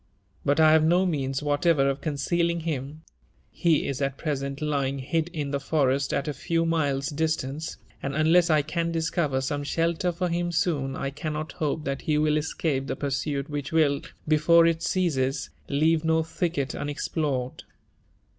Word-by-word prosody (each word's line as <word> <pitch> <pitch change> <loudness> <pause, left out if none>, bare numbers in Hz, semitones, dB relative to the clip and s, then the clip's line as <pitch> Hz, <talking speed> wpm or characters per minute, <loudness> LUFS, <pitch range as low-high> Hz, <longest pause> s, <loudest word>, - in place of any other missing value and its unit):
But 145 +3 +2
I 155 -1 +7
have 160 0 +5
no 175 +4 +4
means 135 -5 -1
whatever 145 -1 +2
of 140 0 -1
concealing 170 +3 0
him: 155 -1 -4 0.5
he 165 -4 +2
is 140 0 -3
at 135 -1 -1
present 140 -3 -3
lying 140 -3 -1
hid 160 +5 -1
in 150 -5 -4
the 140 - 0
forest 140 -2 +1
at 140 - -1
a 150 - -1
few 165 +4 0
miles' 145 -4 0
distance, 155 -1 -2 0.2
and 140 0 -3
unlesslcan 160 0 +3
discover 160 -4 0
some 145 +2 -2
shelter 170 +4 0
for 180 +2 -2
him 175 +1 -1
soon, 155 -6 0
I 135 -1 -3
cannot 155 +1 -4
hope 155 0 -2
thathe 140 +2 -1
will 155 0 +2
escape 145 -3 -1
the - - -2
pursuit 140 0 -2
which 145 -2 -4
will, 150 -3 +3 0.3
before 160 +2 +5
it 165 -1 +1
ceases, 160 -7 0 0.2
leave 155 +3 +2
no 160 0 +2
thicket 160 -4 -2
unex 145 0 -4
plored." 135 -6 -2
150 Hz, 160 wpm, -26 LUFS, 140-165 Hz, 0.5 s, I